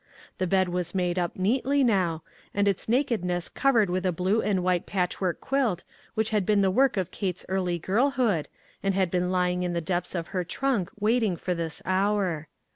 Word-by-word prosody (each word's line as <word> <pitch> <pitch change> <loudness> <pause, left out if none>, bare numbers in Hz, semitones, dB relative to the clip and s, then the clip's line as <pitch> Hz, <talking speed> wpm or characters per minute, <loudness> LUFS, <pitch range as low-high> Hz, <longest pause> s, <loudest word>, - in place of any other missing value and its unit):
The 185 - 0
bed 190 +1 +3
was 175 0 -3
made 180 -1 0
up 175 -1 -2
neatly 260 +8 +2
now, 180 -9 +1 0.3
and 205 0 +2
its 200 +1 0
nakedness 220 -9 0
covered 240 -7 +3
with 180 +1 -1
a 185 - +2
blue 185 +6 +1
and 190 -3 0
white 180 -1 +1
patchwork 180 -1 -1
quilt, 250 -10 0 0.3
which 220 0 0
had 210 -2 +2
been 205 +1 +3
the 190 -1 +3
work 260 +2 +3
of 185 -2 -1
Kate's 185 -3 -3
early 185 -2 0
girlhood, 220 - +1 0.3
and 195 -1 0
had 190 -3 +1
been 180 0 0
lying 180 -1 +1
in 180 -1 -1
the 170 - 0
depths 175 +2 -2
of 170 -1 -3
her 185 -2 -1
trunk 205 0 -1
wait 225 +4 +2
ing 205 -5 +1
for 180 - -2
this 165 -2 -4
hour. 190 -4 0
185 Hz, 200 wpm, -27 LUFS, 180-210 Hz, 0.3 s, bed